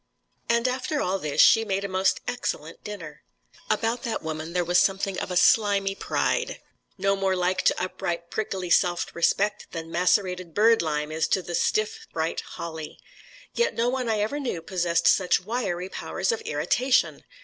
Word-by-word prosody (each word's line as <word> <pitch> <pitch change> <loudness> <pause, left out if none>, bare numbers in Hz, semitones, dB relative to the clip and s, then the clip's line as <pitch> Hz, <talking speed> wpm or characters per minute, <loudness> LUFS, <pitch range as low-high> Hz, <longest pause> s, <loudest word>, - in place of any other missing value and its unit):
And 235 +1 +3
after 260 +4 -1
all 190 -5 0
this, 150 -4 -3
she 225 - +6
made 195 -2 -2
a - - -1
most 190 0 +1
excellent 165 -10 -4
dinner. 175 -8 -8 0.5
About 225 +3 0
that 235 -4 -3
woman 160 +1 -5
there 180 -1 +1
was 175 +1 +4
something 195 0 +1
of - - -4
a 180 - -1
slimy 200 -1 +4
pride, - - -1 0.4
no 195 +1 +2
more 195 -1 0
like 180 +1 0
to - - +3
upright 170 -2 -4
prickly 190 -5 -3
self 175 -1 +2
respect 200 +4 +1
than 165 -1 -6
macerated 180 -1 +1
bird 225 +2 +5
lime 150 -1 -2
is 160 +1 0
to 190 - +1
the 175 - -6
stiff 215 +5 0
bright 160 0 -2
holly. 160 -2 -7 0.6
Yet 475 0 +1
no 235 +1 +1
one 255 -2 -2
I 215 -2 +1
ever 250 +8 -1
knew 240 - -3
possessed 170 -2 0
such 180 -2 +4
wiry 190 -4 -2
powers 190 - -2
of 455 -1 -3
irritation. 260 - +1
190 Hz, 170 wpm, -25 LUFS, 170-220 Hz, 0.6 s, she